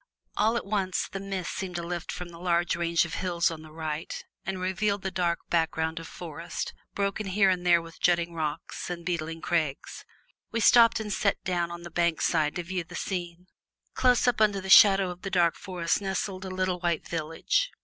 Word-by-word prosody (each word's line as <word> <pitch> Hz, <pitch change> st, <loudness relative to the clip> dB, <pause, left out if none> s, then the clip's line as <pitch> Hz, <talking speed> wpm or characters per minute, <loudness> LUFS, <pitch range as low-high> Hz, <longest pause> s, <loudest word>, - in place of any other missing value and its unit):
All 220 Hz, +3 st, +2 dB
at -, -, -4 dB
once 195 Hz, -2 st, -1 dB
the 195 Hz, -, -6 dB
mists 195 Hz, -2 st, -4 dB
seemed 185 Hz, -2 st, -4 dB
to 170 Hz, -, -2 dB
lift 175 Hz, 0 st, -4 dB
from 180 Hz, -1 st, -6 dB
the 170 Hz, -1 st, -12 dB
long 175 Hz, -1 st, +2 dB
range 170 Hz, 0 st, +2 dB
of 160 Hz, -, -8 dB
hills 175 Hz, -1 st, 0 dB
on 160 Hz, -1 st, -7 dB
the 155 Hz, 0 st, -13 dB
right 155 Hz, 0 st, -4 dB, 0.4 s
and 190 Hz, -1 st, -2 dB
revealed 195 Hz, +2 st, 0 dB
the 190 Hz, -, -2 dB
dark 175 Hz, -2 st, 0 dB
background 160 Hz, -1 st, 0 dB
of 165 Hz, -, -8 dB
forest, 165 Hz, 0 st, -6 dB, 0.2 s
broken 200 Hz, +1 st, -1 dB
here 195 Hz, 0 st, +4 dB
and 180 Hz, -1 st, -1 dB
there 170 Hz, -1 st, +4 dB
with 165 Hz, -1 st, -13 dB
jutting 170 Hz, -1 st, +2 dB
rocks 155 Hz, 0 st, -4 dB
and 170 Hz, -1 st, -5 dB
beetling 165 Hz, -2 st, -3 dB
crags. 155 Hz, -6 st, -2 dB, 0.5 s
We 230 Hz, -, -1 dB
stopped 230 Hz, +1 st, +6 dB
and 210 Hz, -2 st, -3 dB
sat 200 Hz, 0 st, 0 dB
down 175 Hz, -2 st, 0 dB
on 170 Hz, 0 st, -8 dB
the 175 Hz, -, -9 dB
bank 170 Hz, -1 st, +1 dB
side 155 Hz, -3 st, +1 dB
to 175 Hz, -, -3 dB
view 180 Hz, +1 st, -3 dB
the 175 Hz, +1 st, -11 dB
scene. 175 Hz, -2 st, -4 dB, 0.5 s
Close 250 Hz, -1 st, +3 dB
up 240 Hz, -3 st, +2 dB
under 205 Hz, -2 st, +4 dB
the 190 Hz, 0 st, -7 dB
shadow 195 Hz, -3 st, +8 dB
of 180 Hz, 0 st, -10 dB
the 195 Hz, -, -4 dB
dark 175 Hz, -3 st, +3 dB
forest 180 Hz, -2 st, -1 dB
nestled 190 Hz, -1 st, -3 dB
a -, -, -5 dB
little 185 Hz, -1 st, -1 dB
white 170 Hz, -2 st, -1 dB
village. 165 Hz, -, 0 dB
175 Hz, 205 wpm, -28 LUFS, 170-190 Hz, 0.5 s, shadow